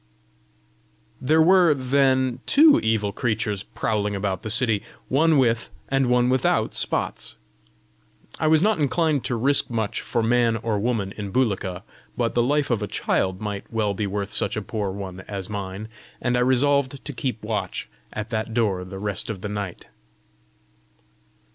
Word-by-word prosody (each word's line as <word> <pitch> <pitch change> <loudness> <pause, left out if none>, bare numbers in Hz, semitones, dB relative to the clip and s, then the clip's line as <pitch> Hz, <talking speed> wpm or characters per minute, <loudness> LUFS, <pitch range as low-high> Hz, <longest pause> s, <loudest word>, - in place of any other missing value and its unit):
There 155 +5 +4
were, 175 -3 +5
then, 130 -1 +2
two 300 +1 +6
evil 110 -2 0
creatures 110 -4 -1
prowling 105 -1 -2
about 95 -1 -2
the 110 - -5
city, 115 -2 +1 0.3
one 155 +3 +4
with, 115 -3 +2 0.2
and 135 -1 +2
one 125 0 +3
without 130 0 +1
spots! - - -2 1.0
I 155 - +1
was 155 +1 +4
not 215 -4 +2
inclined 150 -1 +1
to 125 - 0
risk 135 +5 +2
much 110 -3 -2
for 115 - -1
man 115 0 +3
or 110 -1 -1
woman 105 -3 -1
in 105 -2 -4
Bulika, 95 -7 -1 0.3
but 120 -2 0
the 120 - +3
life 140 +2 +1
of 115 -3 +1
a 105 - -2
child 95 0 -1
might 105 -2 -5
well 110 -3 0
be 100 +1 -2
worth 100 0 -3
such - - +1
a 110 - -2
poor 105 -1 -3
one 95 -1 -6
as 100 -1 -5
mine, 100 +1 -5 0.3
and 125 0 0
I - - +2
resolved 135 +1 +2
to 145 - -5
keep 120 -3 -3
watch 105 -1 -3 0.2
at 110 +2 -5
that 110 0 -3
door 100 -6 +1
the 90 +1 -8
rest 100 0 -3
of 100 -4 -5
the 105 - -4
night. 100 -3 -5
115 Hz, 165 wpm, -24 LUFS, 105-130 Hz, 1.0 s, two